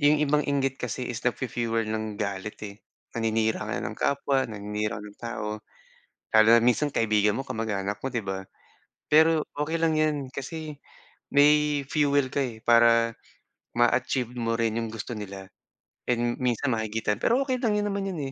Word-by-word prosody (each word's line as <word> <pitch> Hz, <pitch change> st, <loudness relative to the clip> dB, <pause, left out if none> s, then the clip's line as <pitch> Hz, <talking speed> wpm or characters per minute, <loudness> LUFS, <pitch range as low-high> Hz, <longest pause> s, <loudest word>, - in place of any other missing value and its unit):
yung 145 Hz, +1 st, +5 dB
ibang 150 Hz, +1 st, +2 dB
inggit 135 Hz, -1 st, 0 dB
kasi 125 Hz, +1 st, -3 dB
is 110 Hz, -, -5 dB
nagfu-fuel 115 Hz, -2 st, -1 dB
ng 110 Hz, -1 st, -3 dB
galit, 100 Hz, 0 st, -4 dB
eh. 100 Hz, 0 st, -8 dB, 0.4 s
Naninira 110 Hz, -1 st, 0 dB
ka -, -, -2 dB
na -, -, -3 dB
ng -, -, -5 dB
kapwa, 140 Hz, -2 st, +1 dB
naninira 105 Hz, 0 st, -3 dB
ka 105 Hz, -, -8 dB
ng 105 Hz, -1 st, -12 dB
tao. 115 Hz, -3 st, -4 dB, 0.8 s
Lalo 110 Hz, 0 st, +6 dB
na -, -, +5 dB
minsan 125 Hz, +5 st, +3 dB
kaibigan 105 Hz, -4 st, +2 dB
mo, 135 Hz, -, -3 dB
kamag-anak 105 Hz, -4 st, -3 dB
mo, 135 Hz, -, -2 dB
'di 120 Hz, -5 st, -3 dB
ba? 95 Hz, 0 st, -5 dB, 0.6 s
Pero 160 Hz, 0 st, +4 dB
okey 150 Hz, +3 st, -1 dB
lang 165 Hz, -1 st, +2 dB
'yan. 155 Hz, -1 st, +2 dB, 0.2 s
Kasi 155 Hz, +3 st, -5 dB, 0.6 s
may 150 Hz, 0 st, +4 dB
fuel 145 Hz, -2 st, +2 dB
ka, 140 Hz, +1 st, 0 dB
eh, 115 Hz, -3 st, -6 dB
para 115 Hz, -1 st, +4 dB, 0.6 s
ma-achieve 120 Hz, 0 st, +1 dB
mo 115 Hz, -1 st, -1 dB
rin 115 Hz, -1 st, +1 dB
yung 115 Hz, -, -4 dB
gusto 115 Hz, +2 st, -6 dB
nila. 100 Hz, -2 st, -7 dB, 0.6 s
And 120 Hz, 0 st, 0 dB
minsan 125 Hz, +1 st, 0 dB
mahigitan, 110 Hz, -1 st, -1 dB
pero 235 Hz, -, +2 dB
okey 260 Hz, -2 st, 0 dB
lang, 215 Hz, -4 st, +1 dB
'yon 205 Hz, -, -1 dB
naman 200 Hz, -1 st, -2 dB
'yon, 185 Hz, -5 st, -4 dB
120 Hz, 170 wpm, -26 LUFS, 110-145 Hz, 0.8 s, Lalo